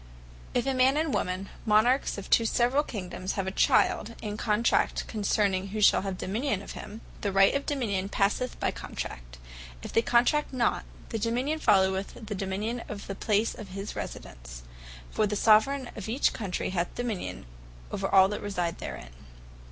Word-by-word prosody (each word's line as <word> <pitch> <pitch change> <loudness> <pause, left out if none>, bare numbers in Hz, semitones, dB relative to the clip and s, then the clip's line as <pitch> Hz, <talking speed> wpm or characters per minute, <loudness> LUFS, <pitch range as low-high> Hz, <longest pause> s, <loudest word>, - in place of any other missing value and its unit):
If 245 - +2
a 270 - +1
man 260 +2 +4
and 315 +1 +1
a - - -2
woman, 185 -2 -1 0.2
Monarches 225 +5 +3
of 200 - -7
two 230 - +4
severall 250 +6 +2
Kingdomes, 185 -7 -5
have 195 - -2
a 190 - -2
Child, 225 +3 +2
and 210 0 -4
contract 215 +1 +1
concerning 200 -2 0
who 210 +2 -4
shall 210 - +5
have 190 -1 -4
the - - -5
Dominion 215 +1 -1
of - - -8
him, 220 +2 -8 0.2
the 200 - -1
Right 195 0 +5
of 280 - -2
the 290 - 0
Dominion 200 -7 -1
passeth 210 +6 0
by - - +1
the - - -10
Contract. - - -7 0.5
If - - -7
they 230 - +4
contract 245 +6 +2
not, 245 -2 +1 0.2
the 225 - -3
Dominion 250 +8 0
followeth 190 -5 +2
the 210 - -4
Dominion 205 +5 -3
of 205 -1 -6
the 195 - -4
place 210 +2 +1
of 215 - -9
his 195 +2 -6
residence. - - -8 0.5
For 215 - +1
the 210 - -2
Soveraign 235 +6 +4
of 215 -1 -6
each 255 +5 +2
Country 195 -4 -3
hath 175 -2 -2
Dominion 230 - -4 0.5
over - - -2
all 190 -1 +7
that 210 - -4
reside 180 -5 -2
therein. - - -7
210 Hz, 185 wpm, -28 LUFS, 190-235 Hz, 0.5 s, all